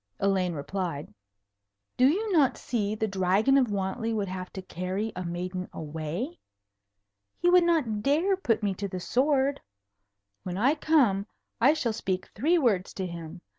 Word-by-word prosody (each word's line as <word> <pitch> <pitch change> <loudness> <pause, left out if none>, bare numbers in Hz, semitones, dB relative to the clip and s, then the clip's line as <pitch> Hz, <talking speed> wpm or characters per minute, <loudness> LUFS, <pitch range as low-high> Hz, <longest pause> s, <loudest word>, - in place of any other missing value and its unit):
Elaine 190 -3 +1
replied. 160 0 -4 0.8
"Do 255 - +5
you 410 +9 +1
not 300 -8 +3
see 215 -3 -2
the 220 0 -1
Dragon 195 +6 +2
of 265 -3 +4
Wantley 205 +4 -2
would 200 -3 -1
have 185 -1 -6
to 190 - -6
carry 185 +4 -3
a 180 - -4
maiden 180 +1 -4
away? 160 - -5 1.0
He 350 +1 +3
would 360 -1 +6
not 290 -12 +1
dare 320 - +2
to 380 - -23
put 225 - +1
me 200 -2 +1
to 200 +2 -4
the 185 -1 -5
sword. 270 +6 +1 0.8
When 180 -1 -5
I 255 +8 +4
come, 260 -11 +2 0.3
I 280 +6 +5
shall 240 -8 -1
speak 190 -4 -3
three 315 - +2
words 210 - +1
to 190 - -3
him. 170 0 -8
205 Hz, 165 wpm, -28 LUFS, 185-275 Hz, 1.0 s, would